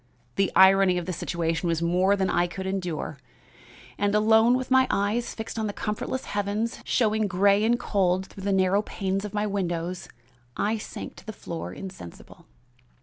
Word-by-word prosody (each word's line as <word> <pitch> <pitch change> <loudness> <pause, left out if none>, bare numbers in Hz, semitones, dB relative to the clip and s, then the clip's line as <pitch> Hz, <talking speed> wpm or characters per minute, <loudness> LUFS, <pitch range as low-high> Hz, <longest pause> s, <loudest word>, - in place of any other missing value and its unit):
The 195 -1 +1
irony 190 -1 +6
of 175 - -3
the 185 - -3
situation 165 0 -2
was 165 -1 +1
more 180 +4 +3
than 190 -1 0
I 175 -1 +1
could 190 +2 -6
endure, 180 -6 -3 0.8
and 205 0 +1
alone, 220 +3 +5
with 255 0 -5
my 260 0 +5
eyes 210 +4 -1
fixed 225 0 -5
on 220 - -1
the 205 - -4
comfortless 210 +6 -3
heavens, 205 +3 -2
showing 220 -3 +1
gray 200 +2 +3
and 240 +2 +2
cold 185 -2 +1
through 195 0 -11
the 200 - +1
narrow 190 +1 +3
panes 195 -1 -3
of 210 0 -7
my 210 0 0
windows, 180 -3 -3 0.5
I 220 +2 0
sank - - -8
to - - -14
the - - -3
floor 170 -4 -6
insensible. 185 - -11
195 Hz, 175 wpm, -26 LUFS, 185-210 Hz, 0.8 s, irony